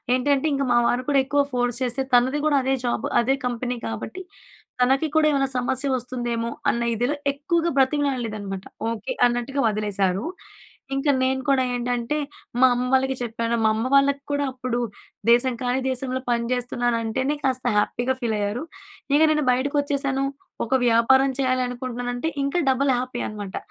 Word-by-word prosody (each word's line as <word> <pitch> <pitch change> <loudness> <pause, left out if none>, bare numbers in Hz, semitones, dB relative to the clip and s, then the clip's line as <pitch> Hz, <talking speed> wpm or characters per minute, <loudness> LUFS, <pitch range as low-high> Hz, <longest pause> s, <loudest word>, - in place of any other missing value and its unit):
ఏంటంటే 275 +3 +1
ఇంక 275 0 0
మా - - +4
వారు 250 +1 0
కూడా 280 -1 +4
ఎక్కువ 285 +1 +2
ఫోర్స్ 245 -1 0
చేస్తే 255 +2 -1
తనది 260 +4 +3
కూడా 295 -2 +3
అదే 265 +1 +1
జాబ్ 240 - -1 0.2
అదే 265 +3 +2
కంపెనీ 245 0 -2
కాబట్టి, 115 - -6 0.6
తనకి 270 +5 +3
కూడా 315 -1 +4
ఏమైనా 275 -2 +2
సమస్య 255 +2 0
వస్తుందేమో 240 -2 -2 0.2
అన్న 235 - 0
ఇదిలో 245 +6 0 0.2
ఎక్కువగా 335 +4 0
బ్రతిమలాడలేదనమాట. 245 -9 0 0.3
ఓకే. 230 - -4
అన్నట్టుగా 245 +3 0
వదిలేశారు. 205 -3 0 0.7
ఇంక 275 +2 -1
నేను 265 0 +1
కూడా 270 -2 +4
ఏంటంటే 245 +2 -1 0.4
మా 260 - +8
అమ్మ 250 +1 -1
వాళ్ళకి 265 0 +2
చెప్పాను. 230 0 -1
మా - - +5
అమ్మ 225 +3 -1
వాళ్ళకి 280 0 +4
కూడా 285 0 0
అప్పుడు 255 -1 -3 0.5
దేశం 245 +2 +4
కానీ 250 +1 0
దేశంలో 260 0 -2
పని 235 -1 0
జేస్తున్నాను 245 -1 0
అంటేనే 260 +6 -1
కాస్త 260 -1 0
హ్యాపీగా 245 +5 0
ఫీల్ 230 -3 -1
అయ్యారు. 205 +5 -2 0.5
ఇక 295 - +5
నేను 300 -1 +1
బయటకి 275 +4 -1
వచ్చేసాను 275 -1 -1 0.4
ఒక 230 - 0
వ్యాపారం 255 +4 +4
చేయాలనుకుంటున్నానంటే 250 0 -1 0.2
ఇంకా 280 +5 0
డబుల్ 265 +1 +2
హ్యాపీ 245 0 -3
అనమాట. 205 -2 -6
255 Hz, 155 wpm, -23 LUFS, 240-275 Hz, 0.7 s, మా